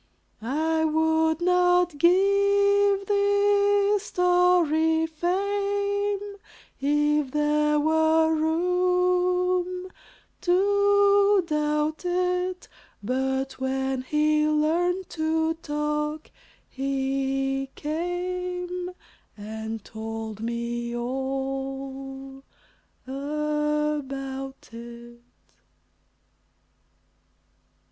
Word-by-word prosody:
I 315 +7 0
would 320 +1 +1
not 355 -1 +3
give 400 +2 +3
this 405 0 +2
story 355 -4 +2
fame 400 +4 -1 0.4
If 295 0 +1
there 300 +1 +1
were 320 +1 +3
room 360 +2 +1 0.5
to 405 +1 +3
doubt 300 0 -1
it, 360 0 -1 0.4
But 265 +3 -2
when 265 0 -1
he 300 +3 +1
learned 340 +5 +1
to 320 0 0
talk, 300 0 -3 0.4
he 270 0 -2
came 360 +2 -3 0.5
And 220 +1 -6
told 220 -1 -6
me 235 +1 -3
all 270 +1 -5 0.6
about 285 -1 -3
it. 235 +1 -11
315 Hz, 60 wpm, -25 LUFS, 270-360 Hz, 0.6 s, not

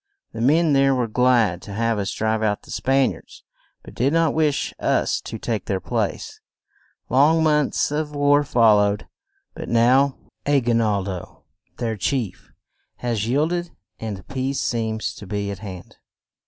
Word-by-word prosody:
The 115 - -6
men 155 +5 +3
there 135 0 +4
were 125 -2 0
glad 115 -6 +2
to 100 - -9
have 115 0 0
us 100 0 -2
drive 110 0 -1
out 105 -2 0
the - - -13
Span 135 0 +2
iards, - - -13 0.4
but - - -12
did 130 +4 +1
not 165 -1 +2
wish 155 -3 0
us - - +1
to - - -7
take - - -3
their - - -1
place. - - -3 0.7
Long 150 +5 +4
months 150 -2 +1
of 150 0 -2
war 145 0 +4
fol 115 -6 +4
lowed, 105 0 0 0.5
but - - -7
now, 130 +4 +3 0.3
A 145 -1 +4
gui 120 -2 0
nal 105 -4 +1
do, 95 -2 -7 0.3
their 115 -2 -2
chief, 120 -1 -2 0.5
has 115 -3 -2
yield 150 +7 +1
ed 175 0 -2 0.3
and 105 -4 -6
peace 135 +1 -2
seems 110 -2 -2
to 100 - -11
be 100 0 -3
at 100 - -7
hand. 95 -4 -9
120 Hz, 170 wpm, -22 LUFS, 105-145 Hz, 0.7 s, there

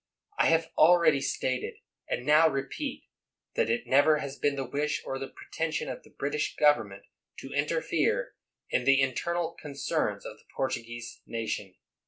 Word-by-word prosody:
I - - +5
have 165 0 +2
already 160 -3 +6
stated, 130 -2 -2 0.3
and 125 - -2
now 155 +2 +6
repeat, 155 - -4 0.5
that 480 - +1
it 240 +1 0
never 145 +3 +5
has 140 -2 -5
been 145 -1 0
the 135 -1 -3
wish 150 +3 -1
or 135 - -3
the 135 - -4
pretension 160 +3 -4
of 130 - -5
the - - -19
British 145 +2 -2
government 105 -10 +2 0.3
to 135 - -8
interfere 160 - 0 0.4
in - - +1
the 135 0 +5
in 135 -1 +2
ternal 170 +4 -2
concerns 140 -2 -2
of - - -7
the - - -25
Portuguese 120 -2 -4
nation. 105 -4 -4
145 Hz, 160 wpm, -29 LUFS, 135-160 Hz, 0.5 s, already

